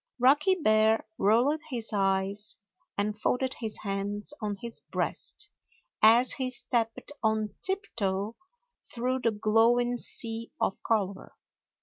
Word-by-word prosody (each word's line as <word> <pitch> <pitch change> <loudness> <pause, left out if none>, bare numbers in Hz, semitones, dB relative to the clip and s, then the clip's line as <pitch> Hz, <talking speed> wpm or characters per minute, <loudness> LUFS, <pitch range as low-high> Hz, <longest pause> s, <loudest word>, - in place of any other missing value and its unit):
Rocky 290 +9 +4
Bear 220 -8 +3
rolled 245 +10 +3
his 235 -4 -3
eyes 195 +1 0 0.4
and 205 +1 0
folded 255 +4 0
his 220 -2 -4
hands 205 +4 -3
on 205 -2 -2
his 235 +1 -4
breast 420 0 -3 0.5
as 235 +3 +6
he 260 -1 +1
stepped 235 -1 -1
on 220 -1 0
tiptoe 220 - 0 0.6
through 255 +2 -1
the 235 - +2
glowing 230 +3 +2
sea 230 0 -3
of - - -1
color. 200 -4 -1
225 Hz, 115 wpm, -28 LUFS, 210-250 Hz, 0.6 s, as